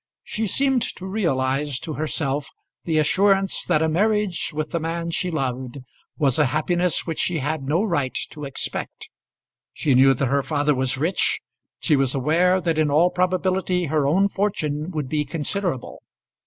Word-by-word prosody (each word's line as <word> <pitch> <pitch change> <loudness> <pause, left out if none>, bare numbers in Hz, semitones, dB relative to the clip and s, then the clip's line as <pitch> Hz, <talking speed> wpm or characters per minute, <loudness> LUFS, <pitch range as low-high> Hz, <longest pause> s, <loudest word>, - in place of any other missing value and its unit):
She 220 0 -3
seemed 270 +4 +2
to 185 - -8
realise 145 - 0
to 160 - -5
herself 145 -1 -2 0.4
the 160 -2 +1
assurance 195 +5 +2
that 160 -3 +2
a - - +2
marriage 205 +1 +1
with 155 0 -4
the 170 - 0
man 165 +1 -3
she 180 +2 -1
loved 130 -4 -3 0.4
was 140 -3 +2
a 150 - +4
happiness 175 +5 0
which 165 -2 -4
she 175 - +1
had 150 +1 -2
no 150 +8 +1
right 145 - -1
to 150 - -9
expect. 135 -1 -5 0.6
She 145 - +1
knew 135 +1 +6
that 135 - 0
her 140 +2 +2
father 145 +1 +1
was 130 0 -1
rich. 165 +7 0 0.4
She 155 - +3
was 135 -1 +1
aware 170 +7 +3
that 165 -3 0
in 155 -1 +2
all 165 +5 +4
probability 185 0 0
her 150 -3 +2
own 190 +7 +3
fortune 170 -7 -2
would 155 -6 -3
be 150 +3 0
considerable. 160 0 -3
155 Hz, 170 wpm, -23 LUFS, 140-180 Hz, 0.6 s, knew